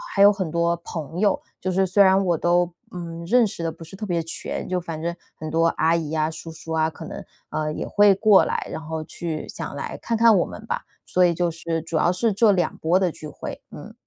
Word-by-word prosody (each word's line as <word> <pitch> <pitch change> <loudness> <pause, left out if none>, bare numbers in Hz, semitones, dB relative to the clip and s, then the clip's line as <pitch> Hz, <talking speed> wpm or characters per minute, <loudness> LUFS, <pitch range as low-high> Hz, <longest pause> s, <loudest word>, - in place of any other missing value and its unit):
还 200 - +3
有 205 +1 +9
很 190 -5 -3
多 170 +1 +1
朋 165 -1 -6
友， 205 -1 +2 0.2
就 185 - -2
是 190 +1 +2
虽 190 +2 +3
然 190 +1 +5
我 175 -3 +2
都， 175 +1 +2 0.2
嗯， 170 -1 -6
认 240 +6 +4
识 200 -5 -5
得 165 - -1
不 165 - -12
是 165 - -11
特 210 +2 -5
别 170 -3 -1
全， 165 - -5
就 180 0 0
反 165 -2 -6
正 170 +1 -2 0.2
很 155 0 -6
多 165 +1 +3
阿 165 0 +2
姨 160 -2 -2
啊 155 0 +1
叔 165 +1 -8
叔 160 0 -10
啊， 160 0 +2
可 155 - -10
能， - - -7 0.3
呃， 155 0 -2
也 - - -4
会 205 -1 +5
过 205 -1 +6
来， - - -2
然 160 - -5
后 160 0 -4
去 160 -1 -5
想 - - -6
来 - - -5
看 230 - -1
看 230 -1 +6
我 180 - +3
们 220 - -9
吧。 - - -3 0.2
所 180 - +2
以 175 - +3
就 175 +1 0
是 165 0 -3
主 165 0 -3
要 175 - +3
是 220 +5 +1 0.2
这 175 - 0
波 170 +3 +2
的 180 -3 +1
聚 155 - -9
会。 - - -7
嗯。 - - -10
170 Hz, 265 characters per minute, -23 LUFS, 160-190 Hz, 0.3 s, 有